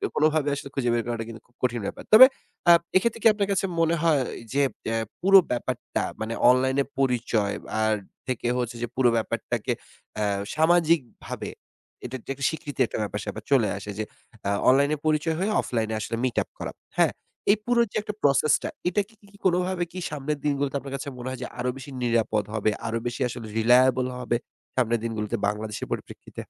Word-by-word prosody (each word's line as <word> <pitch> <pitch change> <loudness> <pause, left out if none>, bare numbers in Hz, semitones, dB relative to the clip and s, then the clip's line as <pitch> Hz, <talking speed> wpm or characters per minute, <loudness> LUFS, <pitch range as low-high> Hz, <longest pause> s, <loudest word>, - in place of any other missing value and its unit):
কোনভাবে 155 -1 +3
আসলে 140 0 -7
খুঁজে 125 -3 0
বের 120 -1 +1
করাটা 115 -1 -2
কিন্তু 110 - -9
খুব 120 - -34
কঠিন 120 -2 +1
ব্যাপার। - - -5
তবে 250 +4 +12 0.4
আ - - +11 0.2
এক্ষেত্রে 230 +4 +2
কি - - +8
আপনার 205 -1 -1
কাছে 195 0 +1
মনে 165 0 +3
হয় 155 -5 +3 0.3
যে, 140 - +3 0.3
এ্যা 115 - 0 0.2
পুরো 195 +1 +8
ব্যাপারটা 120 - -2 0.2
মানে 110 +1 -2 0.2
অনলাইনে 130 +2 +3 0.2
পরিচয় 120 -5 +1 0.3
আর 110 0 +3 0.3
থেকে 125 -2 -2
হচ্ছে 120 -1 -2
যে, 120 - -1
পুরো 125 -2 +4
ব্যাপারটাকে 110 - -2 0.4
অ্যা 105 -1 +1 0.3
সামাজিকভাবে 160 -4 +1 0.6
এটা 125 +1 -5 0.2
একটা 135 0 -3
স্বীকৃতির 145 -5 -1
একটা - - -4
ব্যাপার-স্যাপার 105 +1 -5
চলে 120 -6 +5
আসে 105 +1 -6
যে - - +1 0.4
আ - - +2 0.2
অনলাইনে 140 +3 +4
পরিচয় 155 +1 +1
হয়ে 200 +4 0
অফলাইনে 110 -2 -2
আসলে 115 - -3
মিট 125 -2 -1
আপ - - -30
করা। - - -4 0.3
হ্যাঁ, - - +4 0.4
এই 215 - +4
পুরো 240 -1 +3
যে - - -13
একটা 210 0 -5
প্রসেস 145 +2 +4
টা - - -2 0.2
এটা 205 +3 +1
কি 205 -2 -20
কোনভাবে 180 0 +2
কি 185 - -6
সামনের 150 0 -3
দিনগুলোতে 140 -1 0
আপনার 135 0 -8
কাছে 140 +1 -5
মনে 125 +1 -6
হয় 130 - -5
যে - - -4
আরো 125 - 0
বেশি 135 +1 -9
নিরাপদ 115 -3 +1
হবে, 110 -1 +1 0.2
আরো 115 - -1
বেশি 120 +3 -4
আসলে 120 -2 -7
রিলায়েবল 125 +2 +5
হবে 120 -1 0 0.4
সামনের 120 -2 +2
দিনগুলোতে 115 0 -2
বাংলাদেশের 105 +1 -3
পরিপ্রেক্ষিতে? - - -7
130 Hz, 180 wpm, -26 LUFS, 115-155 Hz, 0.6 s, তবে